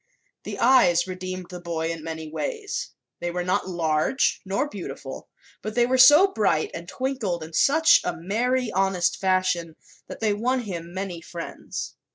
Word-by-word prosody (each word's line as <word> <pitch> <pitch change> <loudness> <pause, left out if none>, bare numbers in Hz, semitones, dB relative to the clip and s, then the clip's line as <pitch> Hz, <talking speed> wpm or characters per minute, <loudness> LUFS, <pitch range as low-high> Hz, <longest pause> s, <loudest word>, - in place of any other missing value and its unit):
The - - -5
eyes 235 -9 +5
redeemed 185 -1 -6
the 180 - -7
boy 165 -1 -3
in 165 -2 -6
many 160 -1 -5
ways. 440 - -4 0.3
They 175 - -2
were 175 +1 -2
not 185 +1 0
large 165 - +1
nor 200 +9 -1
beautiful, 140 - -8 0.3
but 215 0 -5
they 240 0 +4
were 255 +1 +1
so 295 +8 +9
bright 200 -8 +1
and 170 +1 -7
twinkled 230 -10 -2
in 160 +1 -10
such 315 - +5
a - - -2
merry, 235 +7 0
honest 190 -2 +1
fashion 185 -4 0 0.3
that - - -8
they 215 -2 +1
won 250 +5 0
him 175 -6 -6
many 185 -2 -5
friends. 170 0 -7
185 Hz, 165 wpm, -25 LUFS, 170-245 Hz, 0.3 s, so